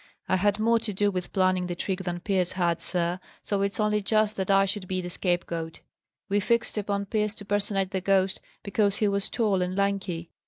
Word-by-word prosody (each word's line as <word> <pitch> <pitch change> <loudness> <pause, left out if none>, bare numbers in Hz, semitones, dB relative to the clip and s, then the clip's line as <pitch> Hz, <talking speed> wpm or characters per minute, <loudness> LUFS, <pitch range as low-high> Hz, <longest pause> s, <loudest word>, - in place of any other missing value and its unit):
"I - - +3
had 205 +2 +2
more 230 +2 +3
to 225 -2 -4
do 205 +1 +2
with 180 -2 -4
planning 185 -1 +2
the 175 - -3
trick 190 +1 -2
than 175 -1 -3
Pierce 185 -2 0
had, 175 -2 0
sir, 175 0 -1 0.2
so 200 -2 -1
it's 200 +2 -1
only 210 0 +2
just 215 +1 +2
that 190 0 -2
I 195 0 +5
should 195 -1 -3
be 185 0 -1
the 180 -1 -5
scapegoat. 170 -3 -2 0.5
We 200 +1 +2
fixed 235 +3 +1
upon 200 -1 -1
Pierce 210 +1 0
to 205 - -9
personate 200 -2 0
the 190 -2 -1
ghost 190 0 +2 0.2
because 200 0 +1
he 210 - +2
was 200 -1 0
tall 210 -5 +1
and 180 +1 -1
lanky. 195 -4 -1
195 Hz, 210 wpm, -27 LUFS, 185-205 Hz, 0.5 s, I